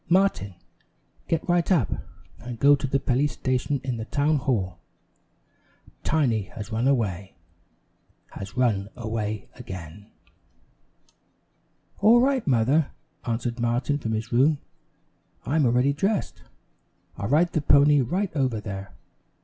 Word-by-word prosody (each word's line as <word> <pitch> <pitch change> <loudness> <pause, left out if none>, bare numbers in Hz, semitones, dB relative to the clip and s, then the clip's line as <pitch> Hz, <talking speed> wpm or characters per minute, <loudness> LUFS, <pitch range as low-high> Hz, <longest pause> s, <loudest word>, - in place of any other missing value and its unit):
"Martin, 175 - +2 0.7
get 165 -1 -1
right 175 +1 +2
up, 160 - +3 0.5
and 120 -1 -7
go 140 +4 +6
to 140 - -3
the 135 +1 +1
police 135 +2 +1
station 130 +2 -1
in 130 -3 -2
the 110 - -5
town 145 +4 +1
hall. 105 - -1 1.2
Tiny 120 -10 +1
has 105 0 -7
run 115 +4 0
away 100 -8 0 1.0
has 95 +2 -8
run 105 -6 +1
away 110 -2 -3
again!" 95 -3 -9 1.9
"All 225 +4 +6
right, 260 -3 +1
Mother," 135 +4 +3 0.4
answered 120 +1 -2
Martin 120 +5 0
from 110 -4 -3
his 110 +2 -3
room. 140 +6 +4 0.9
"I'm 145 +2 +2
already 125 +4 +3
dressed, 195 +8 -1 0.7
I'll 100 - -4
ride 165 +5 +3
the 155 - +1
pony 145 0 +5
right 180 - -2
over 130 -6 0
there." 95 -2 -7
125 Hz, 125 wpm, -25 LUFS, 110-145 Hz, 1.9 s, go